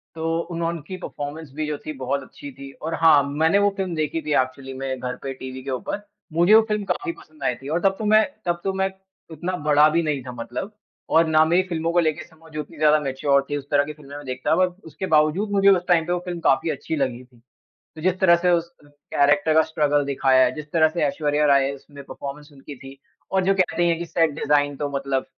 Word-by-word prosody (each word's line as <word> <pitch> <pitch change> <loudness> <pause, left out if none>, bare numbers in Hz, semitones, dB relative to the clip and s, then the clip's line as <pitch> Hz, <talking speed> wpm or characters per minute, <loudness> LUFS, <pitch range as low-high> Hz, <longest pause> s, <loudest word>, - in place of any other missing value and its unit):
तो 165 0 -1
उन्होंन 170 0 -2
की 185 - -6
परफ़ॉरमेंस 145 0 -6
भी 155 -1 -2
जो 150 -1 -3
थी 155 - -4
बहुत 135 +2 -2
अच्छी 145 - -11
थी। 135 +1 -11
और 160 +2 -3
हाँ, 150 -3 +6
मैंने 160 +7 +2
वो 205 0 +4
फ़िल्म 185 -3 -2
देखी 155 +1 -1
थी 150 - -2
एक्चुअली 130 +1 -6
में 130 -1 -4
घर 125 0 -4
पे 135 -1 -4
टीवी 130 0 -8
के 135 - -4
ऊपर, 130 +10 -4 0.3
मुझे 175 +5 +4
वो 225 - +8
फ़िल्म 210 -1 0
काफ़ी 170 - -2
पसंद 155 -3 -15
आई 125 - +1
थी। 135 +3 -12
और 165 +3 +1
तब 195 0 +3
तो 215 - -3
मैं, 215 +1 +5 0.2
तब 175 0 0
तो 195 - -1
मैं 190 0 0 0.4
उतना 175 +4 -3
बड़ा 150 +1 +6
भी 165 +2 +1
नहीं 150 -4 -1
था 125 - -7
मतलब। 125 - -6 0.4
और 165 0 +4
ना 155 0 +5
मेरी 175 +3 +3
फ़िल्मों 165 0 -1
को 175 - +4
लेके 160 -1 0
समझ 160 -1 -18
उतनी 150 +1 -7
ज़्यादा 155 0 +4
मैच्योर 140 0 +1
थी। 145 - -1
उस 140 0 -9
तरह 145 0 +4
की 150 - -6
फ़िल्में 145 -1 -13
में 145 - -10
देखता 130 +5 -1
बट 185 +1 0
उसके 175 +4 -6
बावजूद 160 +8 +2
मुझे 200 0 +4
उस 180 -2 +3
टाइम 170 -3 +3
पे 175 - -1
वो 180 - 0
फ़िल्म 175 -1 -4
काफ़ी 145 +4 +2
अच्छी 160 - -3
लगी 130 -3 -2
थी। 125 -2 -23 0.6
तो - - -8
जिस 185 0 +1
तरह 170 -2 +6
से 180 +1 +1
उस 170 0 +1 0.2
कैरेक्टर 145 +3 +1
का 160 - +6
स्ट्रगल 150 -2 +1
दिखाया 135 -2 +3
है, 125 - 0
जिस 150 0 -8
तरह 160 -2 +4
से 170 +1 -3
ऐश्वर्या 150 +1 0
राय 140 -1 +4
है 140 - -3
उसमें 140 +1 -13
परफ़ॉर्मेंस 145 +2 -8
उनकी 140 0 -11
थी। 135 +1 -12 0.3
और 190 -1 +2
जो 195 +1 +3
कहते 175 -1 +2
है 170 - +3
की 170 - -4
सेट 165 -1 +2
डिज़ाइन 145 -1 +1
तो 145 0 -2
मतलब 140 -1 -2
155 Hz, 245 wpm, -23 LUFS, 140-170 Hz, 0.6 s, वो